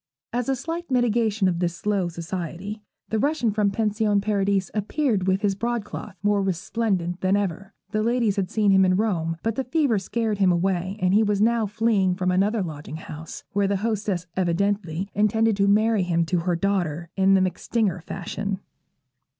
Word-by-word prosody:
As 245 +1 -1
a 270 - +2
slight 335 +6 -5
mitigation 230 -5 +2
of 175 -2 0
this 175 -1 -1
slow 200 -1 0
society, 175 +4 -5 0.3
the 220 - 0
Russian 280 -4 +1
from 205 -1 +2
Pension 210 0 +1
Paradis 200 -2 0
appeared 215 -2 0
with 190 +2 +1
his 200 -1 +2
broadcloth 215 -2 -4
more 205 0 +3
resplendent 190 -1 -1
than 190 +2 +3
ever. 195 0 -3 0.2
The 215 -1 0
ladies 230 -2 +1
had 195 -3 -1
seen 210 -2 +2
him 190 0 +6
in 185 -1 +3
Rome; 170 -6 0
but 225 - 0
the 265 - -2
fever 260 -5 +1
scared 215 +2 -2
him 190 -2 +4
away, 185 +2 0
and 185 -1 +2
he 210 - +5
was 210 -2 +1
now 225 0 +2
fleeing 205 -3 +1
from 185 -1 0
another 200 +3 +2
lodging 155 -2 -6
house, 160 0 -9
where 200 -1 +2
the 200 0 +1
hostess 205 -5 -1
evidently 185 0 0
intended 220 +1 +2
to 200 0 +3
marry 215 +1 +3
him 170 -2 +1
to 175 +1 0
her 175 +1 0
daughter, 170 -3 -1
in 195 0 +4
the 190 - +4
MacStinger 185 0 0
fashion. 195 +3 -4
200 Hz, 180 wpm, -24 LUFS, 185-220 Hz, 0.3 s, him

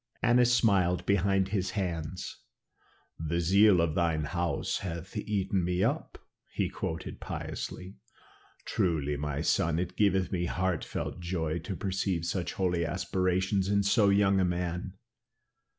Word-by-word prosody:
Annas 120 0 +5
smiled 95 -7 +3
behind 95 0 +2
his 95 -2 -1
hand. 85 -2 -3 0.9
"The 80 +1 -1
zeal 95 +3 +5
of 80 -2 +1
thine 85 -2 +1
house 85 +4 -1
hath 90 +2 -6
eaten 100 -3 -1
me 90 +2 0
up," 140 +8 -1 0.3
he - - -1
quoted 80 0 -5
piously. 95 +2 -6 0.7
"Truly, 75 -5 0
my 75 0 -3
son, 80 -1 +1
it 90 0 -3
giveth 95 -3 +2
me 90 -2 0
heartfelt 95 -1 -2
joy 85 -2 -2
to 95 +4 -5
perceive 95 -1 -1
such 90 -1 -2
holy 90 -3 0
aspirations 95 +3 0
in 100 0 +2
so 100 0 +4
young 100 -1 +4
a - - +3
man. 90 +1 -2
90 Hz, 135 wpm, -29 LUFS, 85-100 Hz, 0.9 s, Annas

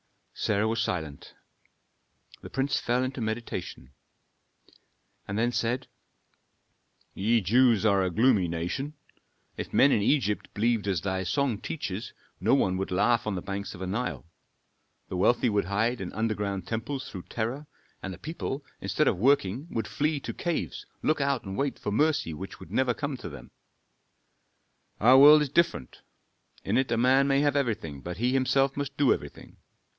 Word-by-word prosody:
Sarah 105 0 0
was 115 +1 0
silent; 80 -9 -4 1.1
the - - -9
prince 135 +1 0
fell 125 +2 0
into 130 -1 -4
meditation, 110 - -5 1.4
and 100 - -3
then 120 +2 +2
said, 120 +1 -1 1.3
"Ye 115 +4 +2
Jews 115 +2 +4
are 100 -2 +4
a 95 - +1
gloomy 110 -1 +3
nation. 90 - -3 0.6
If - - -5
men 140 - +5
in 105 - +3
Egypt 105 -3 +1
believed 110 -1 +1
as 95 -5 0
thy 95 -1 -2
song 115 +4 0
teaches, 110 - -5 0.3
no 110 +9 +3
one 95 -9 +1
would 95 - -3
laugh 105 +5 +2
on 105 - -1
the 90 - -4
banks 100 0 -5
of - - -11
the - - -2
Nile. 105 +1 -3 0.8
The 90 - -3
wealthy 120 +7 +3
would 105 -3 +1
hide 110 +4 0
in 90 - -5
underground 105 -4 -2
temples 120 +6 -4
through 90 -3 -8
terror, 125 +6 -3 0.3
and 95 - -5
the 90 - -8
people, 145 - -5
instead - - 0
of - - +2
working, 130 - +2
would 110 -2 -3
flee 145 +9 0
to - - -5
caves, 170 -2 -3 0.2
look 155 -1 +1
out 140 -2 0
and 95 -1 -6
wait 140 +3 -1
for 105 - -4
mercy 145 - +1
which 95 +6 -8
would - - -12
never 130 -2 +1
come 140 -2 -3
to - - -7
them. - - -11 1.5
"Our 125 +5 +7
world 150 +2 +9
is 145 - -4
different: 170 - 0 0.6
in - - +1
it 130 -2 -1
a 115 - +2
man 130 +3 +4
may 135 0 +3
have 145 -1 +2
everything, 105 - -2
but 90 +3 -6
he 125 +4 +1
himself 135 +1 +2
must 140 0 -4
do 140 -3 +5
everything. - - -9
115 Hz, 170 wpm, -28 LUFS, 100-135 Hz, 1.5 s, world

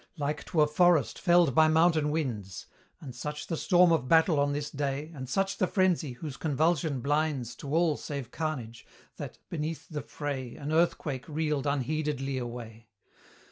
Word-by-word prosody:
Like 145 0 -2
to 160 - +1
a 150 - +5
forest 165 -2 +3
felled 175 -5 +4
by 155 +4 +6
mountain 160 -1 +3
winds; 115 - -3 0.4
And 135 -5 -8
such 150 +4 -5
the 165 - -3
storm 175 +1 +4
of 145 -6 +1
battle 160 0 +4
on 145 0 +2
this 145 0 -3
day, 145 +2 -3
And 130 -4 -7
such 195 +5 0
the 185 - +3
frenzy, 180 - +1
whose 140 +2 -7
convulsion 155 -2 0
blinds 145 -3 0
To 140 - -7
all 165 -3 +3
save 140 -5 -6
carnage, 125 -8 -4 0.3
that, - - -7
beneath 160 0 -4
the 150 -2 -4
fray, 135 -4 -5
An 150 0 -5
earthquake 155 -4 0
reeled 150 -2 -1
unheededly 140 -1 -1
away! 115 -2 -8
150 Hz, 165 wpm, -29 LUFS, 135-160 Hz, 0.4 s, by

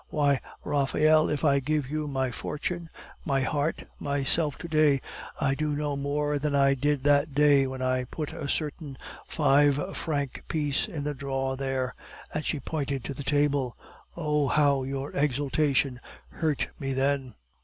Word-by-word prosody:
Why, 145 -3 +2 0.2
Raphael, 155 +2 +3
if 150 +1 -1
I 140 -1 +4
give 145 0 -1
you 155 0 -2
my 130 -2 -1
fortune, 170 +6 -4 0.3
my 135 -2 +1
heart, 145 +3 -1
myself 145 +1 +1
to - - -7
day, 155 -3 +4 0.4
I 135 - +2
do 150 +1 -1
no 145 -1 -1
more 145 +1 -1
than 145 0 0
I 140 0 +5
did 145 0 0
that 145 0 +3
day 145 -2 +5
when 130 0 -4
I 130 0 +1
put 150 +4 -5
a 140 - -5
certain 150 -2 -2 0.3
five 145 +6 +3
franc 145 -5 -2
piece 145 -3 +1
in 150 -4 -5
the 150 0 -1
drawer 135 -1 -2
there," 130 -1 -2 0.4
and 155 - -2
she 150 - -1
pointed 140 -2 -3
to 140 - -4
the 135 - -7
table. 140 -3 +1 0.4
"Oh, 150 -3 +1
how 140 -1 +3
your 135 +1 -4
exultation 140 -1 +1 0.3
hurt 155 -4 -1
me 135 -1 -2
then!" 135 -2 0
145 Hz, 160 wpm, -27 LUFS, 135-150 Hz, 0.4 s, I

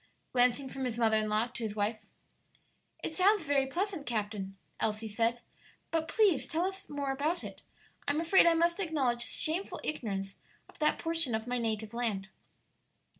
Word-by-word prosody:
glancing 250 +2 +3
from 265 +1 -5
his 240 -2 -2
mother 220 -2 +4
in 215 0 0
law 215 +2 +2
to 245 0 -8
his 215 -2 -3
wife. 215 +1 0 1.0
"It - - -2
sounds 395 +3 +4
very 280 -2 +2
pleasant, 360 0 -2
captain," 205 -4 -3 0.2
Elsie 220 0 -1
said; 230 +3 0 0.5
"but 325 -1 0
please 405 - +3
tell 330 +3 0
us 385 -2 -5
more 285 -2 -2
about 305 +6 -1
it; - - -8 0.5
I'm 285 +2 +2
afraid 335 +2 +6
I 335 - +6
must 340 +2 +2
acknowledge 280 -10 +1
shameful 325 +9 -1
ignorance 195 -9 -3 0.3
of - - -18
that 305 0 +3
portion 330 -7 +1
of 220 0 -3
my 245 0 -1
native 220 -1 -2
land." 215 -5 -2
255 Hz, 170 wpm, -31 LUFS, 220-325 Hz, 1.0 s, afraid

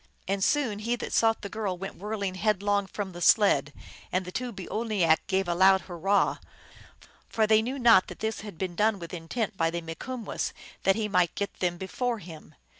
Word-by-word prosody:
And 195 0 0
soon 245 -7 +1
he 230 +3 -1
that - - -6
sought 225 -1 +2
the - - -3
girl 200 -3 -3
went 195 +2 -6
whirl 210 +2 -4
ing 190 -2 -1
headlong 205 0 +1
from 195 -1 -5
the 175 0 -9
sled, 150 -6 +4 0.4
and 185 0 0
the 180 - -7
two 250 +4 -3
boo 190 -4 -8
oinak 210 -8 +2
gave 190 -1 0
a 175 - +1
loud 190 +2 +5
hurrah; 190 +3 +1 0.9
for 220 - +2
they 215 0 +5
knew 255 +5 -3
not 230 -7 +6
that - - -9
this 220 0 -3
had 205 -5 -9
been 185 -1 -3
done 210 +3 +2
with 170 -2 -9
intent 195 +6 -3
by 165 0 +2
the 170 +1 -3
Mikumwess, 220 +9 -5 0.3
that 195 - +5
he 220 -1 -1
might 180 -4 +2
get 200 - -3
them 175 -1 0
before 240 +6 -2
him. 165 -5 -12
200 Hz, 205 wpm, -28 LUFS, 180-220 Hz, 0.9 s, not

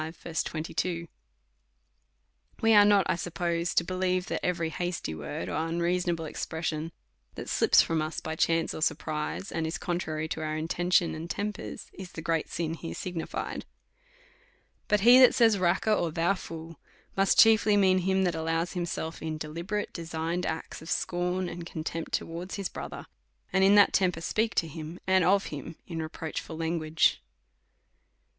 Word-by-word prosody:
V. 160 +1 -8
22. 165 +2 -2 1.5
We 225 0 +4
are 205 -1 +9
not, 205 -3 +5
I - - +2
suppose, 170 0 -2
to - - +4
believe 185 0 0
that - - -2
every 170 -2 0
hasty 175 - -3
word, 80 +2 -5
or 155 - -1
unreasonable 170 0 0
expression 160 +1 -3 0.4
that - - -7
slips - - +5
from 165 -1 0
us 155 +1 -3
by 160 - -4
chance 165 0 +1
or - - -6
surprise, 155 +3 -2
and 165 -1 -1
is 160 - -3
contrary 160 -3 -2
to 160 - -3
our 155 0 -2
intention 175 +2 +1
and 160 +2 -6
tempers, 210 +3 -5
is 190 -2 -9
the 165 - -7
great 165 -1 0
sin 165 -1 -2
here 165 0 -6
signi 175 -3 -4
fied. - - -4 1.3
Cut 210 -2 +3
he 240 +4 +8
that 255 - +7
says, 225 -4 +4
Raca, 180 +4 +2
or 170 -5 +1
Thou 165 +4 +2
fool, 165 -4 -8 0.4
must 195 0 +3
chiefly 220 -2 +6
mean 185 -2 +4
him 190 +1 +1
that 180 -2 +1
allows 165 +1 -1
himself 170 -2 -3
in 160 -1 -3
deliberate, 170 +7 -4
de 170 - -5
signed 165 +2 -2
acts 160 -1 -5
of 160 - -10
scorn 180 +1 -1
and 175 0 -6
contempt 165 0 -5
towards 170 +3 -3
his 200 -2 -3
brother,, - - -7 0.5
and 190 - +4
in 195 +1 +6
that 205 -1 +6
temper 180 -4 +2
speaks 215 +4 +1
to 165 - -8
him, 160 +2 -8
and 190 -1 +4
of 195 +2 +3
him, 150 +3 -7
in 165 -2 -4
re 155 - -4
proachful 160 0 -6
language. 160 -1 +1
170 Hz, 170 wpm, -28 LUFS, 160-185 Hz, 1.5 s, are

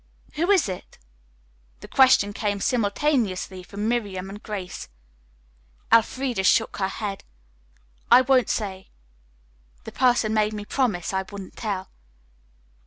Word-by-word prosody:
"Who 335 +5 -1
is 385 - +4
it?" 185 -2 -7 0.8
The - - -9
question 255 -6 +4
came 205 -1 -2
simultaneously 210 -4 0
from 200 +3 -5
Miriam 200 -5 -2
and 205 +1 -9
Grace. 195 -4 -6 1.0
Elfreda 235 -1 +2
shook 225 +4 +3
her 190 - 0
head. 195 0 -5 0.9
"I 245 +2 +8
won't 260 -1 +3
say. 190 -3 -3 0.9
The - - -8
person 245 -4 +2
made 215 0 +1
me 210 -1 -6
promise 210 -9 -1
I 190 - +1
wouldn't 200 -2 -9
tell." 200 -4 -4
210 Hz, 120 wpm, -24 LUFS, 195-245 Hz, 1.0 s, I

